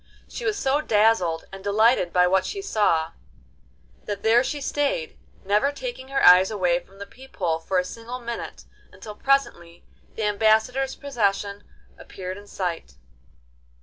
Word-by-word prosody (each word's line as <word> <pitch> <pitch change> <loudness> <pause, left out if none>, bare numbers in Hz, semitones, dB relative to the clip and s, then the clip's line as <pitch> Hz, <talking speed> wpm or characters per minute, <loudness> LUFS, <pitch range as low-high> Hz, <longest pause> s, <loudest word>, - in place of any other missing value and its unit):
She - - -7
was 425 -1 0
so 280 -3 +1
dazzled 210 - +2
and 195 0 -9
delighted 205 -2 +3
by 180 0 +4
what 190 +1 +2
she 405 - -5
saw, 205 - +1 0.9
that 205 -1 -5
there 230 +3 +4
she 290 - -3
stayed, 425 - -2 0.3
never 210 +8 +2
taking 385 - -7
her 270 0 +1
eyes 180 +1 +8
away 180 -5 +1
from 195 +2 -21
the 200 - -8
peep 260 +6 -16
hole 165 -4 -1
for 185 +3 -2
a 180 - +1
single 230 +5 -7
minute, 235 -1 -7 0.3
until 215 - -10
presently 210 -10 -1 0.3
the 220 - -3
ambassador's 220 +6 +2
procession 205 -7 -2 0.4
appeared 185 +1 -8
in 205 - -15
sight. 180 -4 -5
210 Hz, 150 wpm, -24 LUFS, 185-265 Hz, 0.9 s, eyes